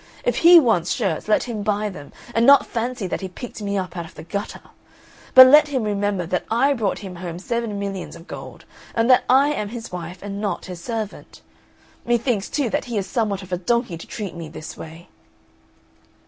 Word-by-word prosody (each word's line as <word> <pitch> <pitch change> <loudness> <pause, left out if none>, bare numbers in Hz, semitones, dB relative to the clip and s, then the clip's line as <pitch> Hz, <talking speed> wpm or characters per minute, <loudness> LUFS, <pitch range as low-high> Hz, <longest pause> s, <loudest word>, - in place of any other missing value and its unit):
If - - +1
he 345 +1 +9
wants 220 - +1
shirts 195 -8 -2
let 215 - +3
him 230 -4 -4
buy 210 0 0
them, 145 -7 -10 0.2
and 230 - +2
not 280 +3 +7
fancy 235 -2 -3
that 180 - -3
he 190 - -4
picked 225 +4 -9
me 200 -1 -2
up 185 -2 -4
out 170 -2 -4
of - - -15
the - - -9
gutter. 200 +5 -5 0.7
But 260 0 +12
let 295 +3 +7
him 265 -5 -1
remember 205 -3 -1
that 180 +1 -1
I 265 +6 +3
brought 220 -7 -1
him 180 -2 -8
home 170 -1 -6
seven 230 +2 -3
millions 195 -3 -5
of 170 0 -13
gold, - - -10 0.3
and 230 0 +2
that 250 0 +5
I 270 +3 +5
am 210 -7 -3
his 230 0 -8
wife 180 +1 -7
and 200 0 -5
not 200 -5 -3
his 180 -2 -8
servant. 220 -2 -6 0.6
Methinks, 235 -3 0
too, 275 -7 -1
that - - -1
he 235 -3 -4
is 195 - -1
somewhat 200 -1 -1
of 185 - -13
a 180 - 0
donkey 235 0 0
to 165 - -10
treat 205 -5 -6
me 165 -2 -8
this 155 0 -9
way!" 165 +2 -11
205 Hz, 210 wpm, -22 LUFS, 180-235 Hz, 0.7 s, But